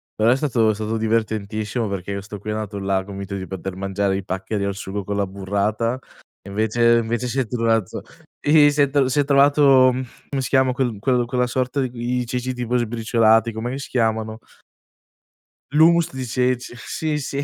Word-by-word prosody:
Però 110 +2 +3
è - - +4
stato 120 -7 +1
è - - -1
stato 110 +1 -3
divertentissimo 110 0 -1
perché 100 0 -4
questo 100 +1 -6
qui 105 - -8
è - - -1
andato 105 -2 -4
là, 95 -1 0
convinto 100 0 -6
di 95 -1 -5
poter 95 0 -6
mangiare 95 0 -1
i 100 - -5
paccheri 95 +2 -3
al 100 -1 -2
sugo 100 0 -5
con 100 - -3
la 100 - +1
burrata 100 +5 -1 0.4
e 100 - -12
invece 115 +3 +2
invece 115 +2 -1
si 135 +3 -2
è 125 - 0
trovato 115 -4 0 0.5
i 145 -1 +7
si 145 0 +1
è 140 - +1 0.2
si 130 +3 0
è - - +4
trovato, 140 -2 +5
ehm, 130 +1 -2 0.2
come 135 -2 -2
si - - -3
chiama 130 -2 +3
quel 125 -5 -1
quel 125 +1 +1
quella 125 0 0
sorta 130 +2 -1
i 125 - -3 0.3
i - - -3
ceci 125 +1 -3
tipo 125 0 -3
sbriciolati, 115 -1 +2
com'è 110 +2 -4
che 135 - -4
si 140 - -7
chiamano? 110 -2 -1 1.3
L'hummus 165 +2 +4
di 130 -1 -4
ceci. 125 0 -1
Sì, 155 +4 -3
sì 140 0 -3
115 Hz, 195 wpm, -21 LUFS, 100-130 Hz, 1.3 s, i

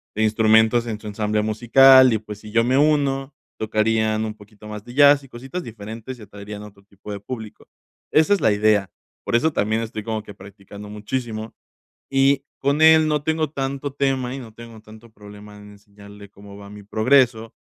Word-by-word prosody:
de 110 - 0
instrumentos 110 +2 +3
en 110 -2 -4
su 110 - -16
ensamble 105 0 -1
musical 130 +4 +6
y, - - +2
pues, 105 -1 -10
si 105 0 -12
yo 115 +1 +3
me 125 +2 +1
uno, 140 -2 +1 0.2
tocarían 110 0 0
un 110 - -5
poquito 105 0 -16
más 105 -1 -8
de 120 - -11
jazz 145 0 +6
y 135 - -16
cositas 135 +10 -7
diferentes 115 +2 -9
y - - -16
atraerían 105 +1 -10
otro 100 -1 -14
tipo 100 +1 -12
de 100 - -5
público. 110 0 -9 0.4
Esa 155 +5 +4
es 200 - 0
la 110 - +3
idea. 105 -1 +2 0.3
Por - - -2
eso 160 +7 +2
también 110 0 0
estoy 110 -1 -6
como 110 -1 -4
que 105 - -11
practicando 100 +1 -13
muchísimo 110 +1 -5 0.6
y 135 +1 +2
con 140 +2 0
él 160 0 +6
no 150 -1 0
tengo 160 0 -1
tanto 140 0 -4
tema 135 -2 -1
y - - -6
no 115 -4 -11
tengo 115 -1 -12
tanto 110 +2 -16
problema 105 0 -14
en 105 0 -14
enseñarle 100 0 -15
cómo 100 0 -14
va 100 0 -12
mi 105 0 -11
progreso, 115 +2 +1
110 Hz, 195 wpm, -21 LUFS, 105-130 Hz, 0.6 s, musical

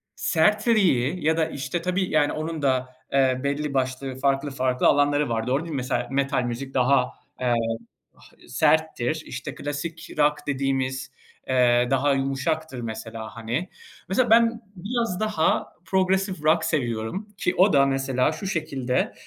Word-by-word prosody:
sertliği 180 - +2
ya 160 +1 +3
da, 160 - +3
işte, 160 +5 -3
tabii, 180 +1 -1
yani, 145 -2 +2
onun 155 0 -4
da, 130 -2 +1 0.2
eee, 130 -2 +3
belli 145 +1 -1
başlı 130 0 -2
farklı, 140 +1 +1
farklı 130 -1 +1
alanları 145 0 +3
var. 115 0 -1
Doğru 135 +5 +1
değil 165 - -7
mi? 140 - -2
Mesela, 125 -1 -1
metal 140 -1 +1
müzik 125 +3 -5
daha, 130 +2 +3 0.3
eee, 125 -1 +2 0.6
ha - - -19 0.2
serttir. - - +1
İşte, - - -6
klasik 155 +3 -5
rock 150 0 +2
dediğimiz, 135 -1 -1 0.4
eee, 125 -1 +3
daha 140 +1 +3
yumuşaktır, 135 +2 -2
mesela, 110 0 -6
hani. 120 +11 -3 0.4
Mesela, 235 +5 +2
ben 230 +1 +4
biraz 205 0 -2
daha 215 -7 0
progresif 190 -1 0
rock 160 +2 +3
seviyorum 120 - -2
ki 180 - 0
o 185 -1 +5
da, 140 -1 +5
mesela, 135 0 +1
şu 175 +5 -6
şekilde, 140 -8 -1
140 Hz, 145 wpm, -24 LUFS, 130-165 Hz, 0.6 s, o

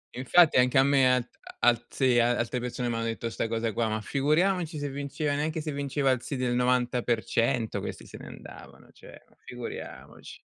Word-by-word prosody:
Infatti 145 +5 +4
anche 125 +2 +3
a 135 - +7
me 135 -2 +4
a 125 - 0 0.4
alt 120 0 +3
sì, 130 -2 +3
alte 120 +1 +1
persone 125 0 -3
m'hanno 115 0 -2
detto 115 0 -3
'sta - - -2
cosa 115 -1 -2
qua, 115 +1 0
ma 110 - -1
figuriamoci 160 - 0
se 145 -1 -3
vinceva 145 +2 -3
neanche 155 +2 -2
se 155 0 -4
vinceva 140 -1 0
il 130 -2 0
sì 140 - -5
del 125 -1 -1
90% 120 -2 0
questi - - -7
se - - -11
ne - - -10
andavano, - - -13
cioè - - -15
ma - - -27
figuriamoci. 120 -1 -9
125 Hz, 180 wpm, -27 LUFS, 120-145 Hz, 0.4 s, a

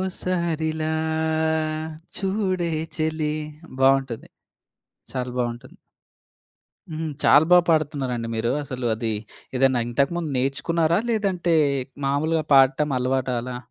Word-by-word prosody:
ఓసారిలా 165 -4 -2 1.3
చూడే 190 -3 0 0.3
చెలి 155 -1 -1 0.5
బావుంటది. 135 -3 +2 0.8
చాలా 125 -1 -3
బావుంటుంది. 120 -1 -4 1.1
హ్మ్. 160 0 -3
చాలా 150 +2 +7
బాగా 180 -1 +7
పాడుతున్నారండి 135 -7 0
మీరు. 115 +1 0
అసలు 125 -2 -4
అది 110 0 -2 0.5
ఏదన్నా 130 -2 +3
ఇంతకుముందు 150 +6 0
నేర్చుకున్నారా? 160 +6 +1
లేదంటే 190 -6 +1 0.5
మామూలుగా 155 +3 +1
పాడటం 135 +2 +4
అలవాట 130 +1 0
అలా? 125 0 -5
150 Hz, 90 wpm, -24 LUFS, 130-170 Hz, 1.3 s, చాలా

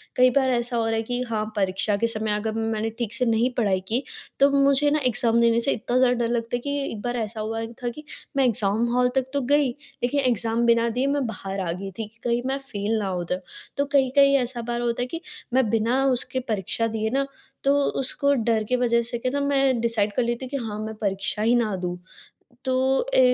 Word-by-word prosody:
कई 255 0 +6
बार 265 -1 +3
ऐसा 240 0 0
हो 230 - +1
रहा 225 0 0
है 225 - 0
कि 245 +2 -3
हाँ 215 -2 -1
परीक्षा 195 +1 +1
के 230 - +1
समय 220 -1 -1
अगर 215 +1 -2
मैंने 225 0 -1
ठीक 230 -2 -2
से 250 - 0
नहीं 230 +1 +2
पढ़ाई 200 -5 +2
की 240 +6 0 0.4
तो 275 +1 +6
मुझे 280 +1 +4
ना 305 - +2
एग्ज़ाम 235 0 +2
देने 230 0 +4
से 275 - +2
इतना 245 +2 -1
ज़्यादा 255 -1 +4
डर - - +1
लगता 235 0 -1
है - - -1
कि 285 - -3 0.2
एक 210 - -6
बार 245 +2 -2
ऐसा 220 -1 -4
हुआ 225 +1 -3 0.2
था 240 - 0
कि 300 - -9 0.3
मैं 270 - +4
एग्ज़ाम 215 -1 +1
हॉल 250 0 +3
तक 265 -1 +2
तो 285 - +1
गई 290 -2 +4 0.3
लेकिन 250 +4 +1
एग्ज़ाम 235 -2 +1
बिना 235 0 +4
दिए 260 +2 +1
मैं 280 -1 +1
बाहर 195 -3 -5
आ - - 0
गई 195 +3 -5
थी 225 - -2
कि 225 +2 -27
कहीं 240 0 +1
मैं 270 +1 0 0.2
फेल 205 +2 0
ना 205 - -2
हो 180 -2 -2
जाऊँ। 180 +2 -2 0.4
तो 280 - +2
कहीं-कहीं 275 0 +4
ऐसा 245 -2 -2
बार 240 0 -1
होता 240 0 -1
है 245 - -1
कि 330 +6 -6 0.3
मैं 255 -3 +3
बिना 230 +4 +2
उसके 255 +1 -2
परीक्षा 215 +2 -1
दिए 220 0 0
ना 275 +3 0 0.4
तो 280 +1 +4 0.2
उसको 280 +1 +1
डर 230 -4 +1
की 250 - +3
वज़ह 235 -1 +2
से 235 +1 -3
के 255 - -1
ना 285 +2 -1
मैं 275 -3 +2
डिसाइड 220 -3 +1
कर 250 - +2
लेती 240 +2 -2
कि 280 +2 -3
हाँ 210 -1 -5
मैं 220 0 -6
परीक्षा 195 +1 -1
ही 230 +3 +3
ना 220 -4 +1
दूँ। 180 -1 -3 0.7
तो 265 - +2
ए, - - +5
235 Hz, 235 wpm, -24 LUFS, 220-260 Hz, 0.7 s, कई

